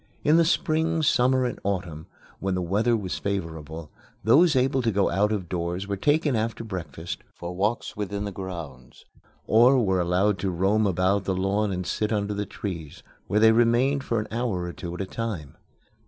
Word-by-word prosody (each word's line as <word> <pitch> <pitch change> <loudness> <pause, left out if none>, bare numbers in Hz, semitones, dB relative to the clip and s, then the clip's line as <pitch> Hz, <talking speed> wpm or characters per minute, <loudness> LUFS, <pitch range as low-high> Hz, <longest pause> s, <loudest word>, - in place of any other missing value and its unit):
In 155 +2 +5
the 170 - +5
spring, 160 0 +1
summer, 130 -2 +3
and 120 - -3
autumn, 90 -6 -3 0.3
when 95 -1 -1
the 90 - -1
weather 105 +7 +2
was 95 -4 -4
favorable, 80 -5 -4 0.3
those 150 +8 +5
able 130 +1 +2
to 115 - +1
go 100 -4 +1
out 100 +4 +2
of 100 -5 -2
doors 90 +2 -3
were 100 - -1
taken 145 - +2
after 115 +1 -2
breakfast 85 -5 -6 0.2
for 85 +1 -6
walks 105 +5 -1
within 100 0 -3
the 100 - -4
grounds, 85 -10 -8 0.4
or 120 +5 +5
were 95 -1 +1
allowed 90 +3 +1
to 95 - -1
roam 100 +4 +2
about 95 +2 +1
the 95 - 0
lawn 100 +2 0
and 90 -1 -3
sit 105 +5 -1
under 105 -1 0
the 105 0 -3
trees, 85 -8 -6 0.2
where 105 +3 +2
they 110 0 +7
remained 120 +4 +3
for 115 -4 0
an 105 - -4
hour 115 -6 -1
or 90 0 -5
two 85 - -7
at 90 - -4
a - - -2
time. 95 - -5
100 Hz, 190 wpm, -25 LUFS, 90-115 Hz, 0.4 s, they